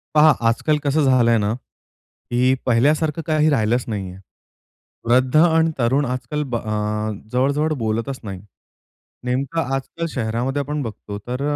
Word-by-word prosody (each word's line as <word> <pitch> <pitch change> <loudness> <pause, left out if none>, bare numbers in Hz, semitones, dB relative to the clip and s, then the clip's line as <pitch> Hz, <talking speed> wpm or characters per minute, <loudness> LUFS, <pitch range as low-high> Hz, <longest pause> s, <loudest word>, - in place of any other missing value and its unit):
पहा 155 +1 +7 0.2
आजकाल 150 +7 +1
कसं 145 +2 +2
झालंय 125 -3 +4
ना 105 0 0 0.8
की 125 +2 +3
पहिल्यासारखं 150 +6 +2
काही 155 -1 +3
राहिलंच 120 -2 +1
नाहीये. 95 -4 -5 0.9
वृद्ध 130 +3 +3
आणि 165 0 +4
तरुण 135 +4 +2
आजकाल 125 +4 -3
ब - - +2
अ, 105 -1 -2 0.2
जवळ-जवळ 140 +5 +1
बोलतच 115 +5 -2
नाही. 95 -3 -6 0.8
नेमकं 135 +6 -1
आजकाल 150 +5 -4
शहरामध्ये 120 +4 -1
आपण 145 +1 -3
बघतो 105 -3 -7
तर 125 +2 -3
130 Hz, 130 wpm, -21 LUFS, 115-150 Hz, 0.9 s, पहा